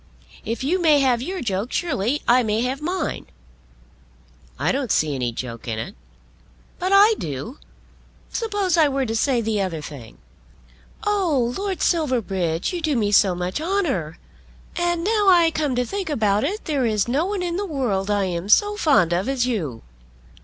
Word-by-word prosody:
If 230 Hz, +2 st, -4 dB
you 350 Hz, +7 st, 0 dB
may 310 Hz, -3 st, +5 dB
have 250 Hz, -3 st, +2 dB
your 365 Hz, +7 st, -4 dB
joke 205 Hz, +1 st, -2 dB
surely 280 Hz, -, -1 dB
I 250 Hz, +1 st, +5 dB
may 220 Hz, -1 st, 0 dB
have 260 Hz, +3 st, -2 dB
mine." 350 Hz, +1 st, -3 dB, 1.3 s
"I -, -, +1 dB
don't 265 Hz, -3 st, -2 dB
see 155 Hz, -2 st, +2 dB
any 125 Hz, -3 st, -2 dB
joke 115 Hz, 0 st, -7 dB
in 110 Hz, -2 st, -2 dB
it." 185 Hz, -, -5 dB, 0.9 s
"But 370 Hz, +1 st, -1 dB
I 405 Hz, +3 st, +7 dB
do. 150 Hz, -, -6 dB, 0.7 s
Suppose 410 Hz, -6 st, 0 dB
I 315 Hz, -2 st, +5 dB
were 275 Hz, -1 st, -1 dB
to 225 Hz, -1 st, -3 dB
say 245 Hz, +1 st, +1 dB
the 215 Hz, -2 st, -1 dB
other 180 Hz, -4 st, -2 dB
thing. 140 Hz, -6 st, -10 dB, 0.9 s
Oh, 330 Hz, -13 st, +1 dB
Lord 390 Hz, -1 st, -3 dB
Silverbridge, 200 Hz, -, 0 dB
you 350 Hz, -, -3 dB
do 310 Hz, -3 st, 0 dB
me 210 Hz, -4 st, +1 dB
so 195 Hz, -3 st, +4 dB
much 180 Hz, +8 st, -3 dB
honour! 315 Hz, -, -1 dB, 0.6 s
And 345 Hz, -1 st, 0 dB
now 420 Hz, +1 st, +1 dB
I 340 Hz, -3 st, +5 dB
come 295 Hz, -5 st, -1 dB
to 250 Hz, 0 st, 0 dB
think 390 Hz, +4 st, -4 dB
about 215 Hz, -7 st, +1 dB
it, 400 Hz, +9 st, -3 dB
there 280 Hz, -6 st, 0 dB
is 215 Hz, -1 st, 0 dB
no 285 Hz, +9 st, 0 dB
one 400 Hz, -2 st, -2 dB
in 345 Hz, -1 st, -2 dB
the 405 Hz, +1 st, -2 dB
world 230 Hz, -, -1 dB
I 205 Hz, -1 st, +1 dB
am 180 Hz, +1 st, -4 dB
so 415 Hz, -, +4 dB
fond 275 Hz, -, +3 dB
of 185 Hz, +8 st, -1 dB
as 260 Hz, -3 st, +1 dB
you. 160 Hz, -, -3 dB
255 Hz, 175 wpm, -22 LUFS, -, 1.3 s, I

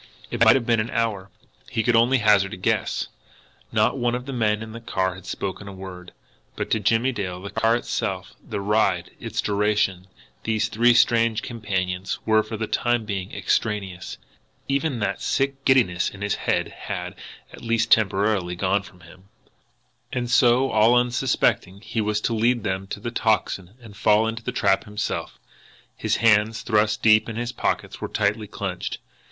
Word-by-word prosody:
It -, -, +2 dB
might -, -, +7 dB
have 130 Hz, -3 st, 0 dB
been 115 Hz, -1 st, +2 dB
an 110 Hz, +2 st, -1 dB
hour 105 Hz, -5 st, -1 dB, 0.4 s
he 115 Hz, -, -1 dB
could 120 Hz, 0 st, +3 dB
only 120 Hz, +4 st, +4 dB
hazard 105 Hz, -4 st, +3 dB
a -, -, -12 dB
guess. 90 Hz, -, -1 dB, 0.6 s
Not -, -, +2 dB
one 120 Hz, 0 st, +1 dB
of 125 Hz, 0 st, -5 dB
the 135 Hz, -, -5 dB
men 110 Hz, -3 st, +1 dB
in 110 Hz, -, -9 dB
the 115 Hz, +1 st, -8 dB
car 95 Hz, -4 st, -1 dB
had 95 Hz, 0 st, -12 dB
spoken 100 Hz, +1 st, -5 dB
a 100 Hz, -, -7 dB
word. 95 Hz, -2 st, -9 dB, 0.4 s
But -, -, -4 dB
to 110 Hz, -, +3 dB
Jimmie 115 Hz, +5 st, +2 dB
Dale, 95 Hz, -6 st, -4 dB
the 100 Hz, +2 st, -8 dB
car 115 Hz, +1 st, +2 dB
itself, 120 Hz, -, -3 dB
the 100 Hz, -, -4 dB
ride, 100 Hz, -4 st, +1 dB
its -, -, -3 dB
duration, 100 Hz, -3 st, 0 dB, 0.4 s
these 110 Hz, 0 st, 0 dB
three 120 Hz, +2 st, +4 dB
strange 115 Hz, -2 st, +3 dB
companions, 95 Hz, -5 st, -3 dB
were 110 Hz, -1 st, +4 dB
for 110 Hz, +1 st, -6 dB
the 110 Hz, -, -2 dB
time 120 Hz, 0 st, 0 dB
being 95 Hz, -3 st, -4 dB
extraneous. 95 Hz, -4 st, -2 dB, 0.5 s
Even 140 Hz, 0 st, 0 dB
that 100 Hz, -1 st, -1 dB
sick 135 Hz, 0 st, -1 dB
giddiness 115 Hz, -10 st, +3 dB
in 95 Hz, -, -13 dB
his 100 Hz, -, 0 dB
head -, -, -1 dB
had, -, -, -6 dB, 0.4 s
at -, -, -11 dB
least 115 Hz, 0 st, 0 dB
temporarily, 100 Hz, -3 st, +2 dB
gone 95 Hz, +2 st, +1 dB
from 90 Hz, -2 st, -16 dB
him. 90 Hz, +3 st, -16 dB, 0.9 s
And 120 Hz, -1 st, -2 dB
so, 125 Hz, +1 st, +4 dB
all 110 Hz, +3 st, +5 dB
unsuspectingly, 120 Hz, -6 st, +1 dB
he 115 Hz, -, -1 dB
was 105 Hz, 0 st, 0 dB
to 115 Hz, -, 0 dB
lead 115 Hz, +1 st, +1 dB
them 95 Hz, -2 st, -2 dB
to 100 Hz, -, -6 dB
the 120 Hz, +3 st, -5 dB
Tocsin 100 Hz, -4 st, 0 dB
and 110 Hz, -4 st, -13 dB
fall 105 Hz, +2 st, +3 dB
into 115 Hz, 0 st, -4 dB
the -, -, -3 dB
trap 95 Hz, -, +1 dB
himself! 105 Hz, 0 st, -4 dB, 0.6 s
His -, -, 0 dB
hands, 110 Hz, -1 st, +3 dB
thrust 105 Hz, -2 st, +1 dB
deep 110 Hz, 0 st, +5 dB
in 110 Hz, -, -5 dB
his 120 Hz, +1 st, -3 dB
pockets, -, -, -2 dB
were -, -, -2 dB
tightly 105 Hz, 0 st, 0 dB
clenched. 95 Hz, -3 st, -4 dB
110 Hz, 180 wpm, -24 LUFS, 100-115 Hz, 0.9 s, might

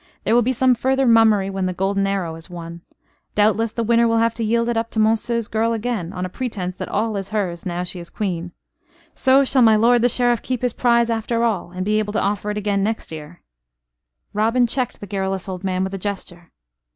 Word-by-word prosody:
There -, -, +1 dB
will 240 Hz, -, +5 dB
be 245 Hz, +2 st, +1 dB
some 260 Hz, 0 st, +3 dB
further 265 Hz, +2 st, +1 dB
mummery 220 Hz, -4 st, +4 dB
when 190 Hz, -1 st, -2 dB
the 185 Hz, -, -2 dB
golden 195 Hz, +2 st, 0 dB
arrow 190 Hz, -4 st, -2 dB
is 165 Hz, +2 st, -11 dB
won. 170 Hz, -1 st, -8 dB, 0.5 s
Doubtless, 215 Hz, +2 st, +2 dB
the 230 Hz, -, -2 dB
winner 235 Hz, +1 st, +3 dB
will 230 Hz, 0 st, +2 dB
have 230 Hz, 0 st, +2 dB
to 230 Hz, -, -4 dB
yield 230 Hz, +2 st, +1 dB
it 240 Hz, -, 0 dB
up 225 Hz, 0 st, -1 dB
to 220 Hz, -, -3 dB
Monceux's 225 Hz, +1 st, +1 dB
girl 225 Hz, +1 st, 0 dB
again, 220 Hz, -6 st, -3 dB
on 180 Hz, -1 st, -4 dB
a -, -, -2 dB
pretence 185 Hz, -4 st, -4 dB
that -, -, -5 dB
all 220 Hz, +1 st, -1 dB
is 195 Hz, -1 st, -5 dB
hers, 190 Hz, -5 st, -3 dB
now 175 Hz, 0 st, -2 dB
she 180 Hz, 0 st, -6 dB
is 170 Hz, -, -9 dB
Queen. 180 Hz, -5 st, -3 dB, 0.6 s
So 265 Hz, +1 st, +4 dB
shall 260 Hz, 0 st, +3 dB
my 220 Hz, -2 st, +6 dB
lord 235 Hz, +2 st, +4 dB
the 245 Hz, -, +4 dB
Sheriff 240 Hz, -1 st, +2 dB
keep 255 Hz, -1 st, -3 dB
his 245 Hz, -2 st, 0 dB
prize 235 Hz, -1 st, +2 dB
after 230 Hz, +1 st, -1 dB
all; 210 Hz, -7 st, 0 dB
and 185 Hz, +1 st, -5 dB
be 215 Hz, +1 st, +2 dB
able 210 Hz, -1 st, -3 dB
to 220 Hz, -, +1 dB
offer 205 Hz, +1 st, -1 dB
it 210 Hz, -, -2 dB
again 200 Hz, -1 st, 0 dB
next 220 Hz, -3 st, -3 dB
year 155 Hz, +2 st, -10 dB, 0.4 s
" -, -, -53 dB
Robin 230 Hz, +4 st, +2 dB
checked 250 Hz, +1 st, -2 dB
the -, -, -5 dB
garrulous 195 Hz, -1 st, -3 dB
old 185 Hz, -1 st, -6 dB
man 185 Hz, -1 st, 0 dB
with 190 Hz, 0 st, -4 dB
a 195 Hz, -, -4 dB
gesture. 180 Hz, -3 st, -6 dB
210 Hz, 235 wpm, -21 LUFS, 185-230 Hz, 0.6 s, my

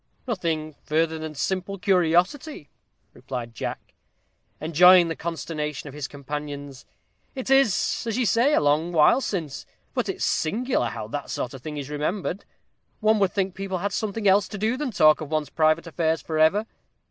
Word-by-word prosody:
"Nothing 165 Hz, -8 st, -2 dB
further 160 Hz, +1 st, 0 dB
than 155 Hz, -1 st, -6 dB
simple 190 Hz, +6 st, -2 dB
curiosity," 180 Hz, -, +1 dB, 0.4 s
replied 125 Hz, -2 st, -6 dB
Jack, -, -, -6 dB, 0.7 s
enjoying 175 Hz, +2 st, +6 dB
the 165 Hz, -, -2 dB
consternation 155 Hz, -3 st, -4 dB
of 140 Hz, -, -9 dB
his 145 Hz, -1 st, -5 dB
companions. 145 Hz, -1 st, -7 dB, 0.5 s
"It 265 Hz, 0 st, -4 dB
is, 260 Hz, -10 st, +3 dB
as 225 Hz, 0 st, -1 dB
you 255 Hz, -, +1 dB
say, 235 Hz, +8 st, +3 dB
a -, -, +3 dB
long 150 Hz, +4 st, +2 dB
while 160 Hz, -, +5 dB
since. 165 Hz, -, -4 dB, 0.3 s
But -, -, -1 dB
it's -, -, -2 dB
singular 225 Hz, -, 0 dB
how 110 Hz, -2 st, -6 dB
that 145 Hz, +3 st, -5 dB
sort 125 Hz, -, -3 dB
of 135 Hz, -, -9 dB
thing 150 Hz, +2 st, -6 dB
is 145 Hz, 0 st, -6 dB
remembered. 175 Hz, +6 st, -3 dB, 0.5 s
One 215 Hz, 0 st, +3 dB
would 195 Hz, -2 st, +2 dB
think 195 Hz, -2 st, -1 dB
people 195 Hz, 0 st, -4 dB
had 195 Hz, +2 st, -3 dB
something 215 Hz, 0 st, -2 dB
else 195 Hz, 0 st, +4 dB
to 210 Hz, -, -7 dB
do 220 Hz, +4 st, 0 dB
than 285 Hz, 0 st, -3 dB
talk 155 Hz, -9 st, +4 dB
of 155 Hz, -, -6 dB
one's 155 Hz, -3 st, -2 dB
private 155 Hz, +1 st, +2 dB
affairs 160 Hz, -1 st, 0 dB
for 155 Hz, -1 st, -2 dB
ever. 190 Hz, +8 st, +4 dB
165 Hz, 170 wpm, -25 LUFS, 150-200 Hz, 0.7 s, enjoying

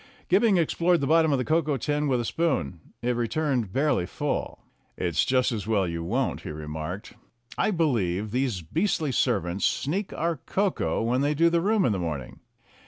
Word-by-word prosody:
Gibbing 200 Hz, +2 st, +4 dB
explored 170 Hz, +1 st, +2 dB
the 140 Hz, -, -1 dB
bottom 160 Hz, +1 st, +4 dB
of 140 Hz, -, +3 dB
the 125 Hz, -, -2 dB
cocoa 155 Hz, -2 st, +1 dB
tin 150 Hz, +3 st, -1 dB
with 130 Hz, -3 st, +1 dB
a 120 Hz, -, -2 dB
spoon. 140 Hz, -, -1 dB, 0.2 s
It 125 Hz, 0 st, +1 dB
returned 120 Hz, -2 st, -1 dB
barely 135 Hz, -8 st, +1 dB
full. -, -, -3 dB, 0.4 s
"It's 85 Hz, -2 st, +1 dB
just 130 Hz, -1 st, +2 dB
as 110 Hz, -3 st, -4 dB
well 100 Hz, -4 st, +2 dB
you 85 Hz, -1 st, -3 dB
won't," 85 Hz, -, -1 dB
he -, -, -7 dB
remarked. 80 Hz, +5 st, -6 dB, 0.4 s
"I -, -, +1 dB
believe 110 Hz, -, 0 dB
these 125 Hz, -7 st, -1 dB
beastly 160 Hz, -, 0 dB
servants 100 Hz, -7 st, 0 dB
sneak 185 Hz, +8 st, 0 dB
our 170 Hz, 0 st, -1 dB
cocoa 195 Hz, -, -1 dB
when 125 Hz, +3 st, +1 dB
they 145 Hz, +1 st, +1 dB
do 165 Hz, +3 st, +4 dB
the 170 Hz, 0 st, +2 dB
room 205 Hz, +1 st, +2 dB
in -, -, +2 dB
the 100 Hz, -, -1 dB
morning." 75 Hz, -8 st, -5 dB
130 Hz, 180 wpm, -26 LUFS, 100-165 Hz, 0.4 s, Gibbing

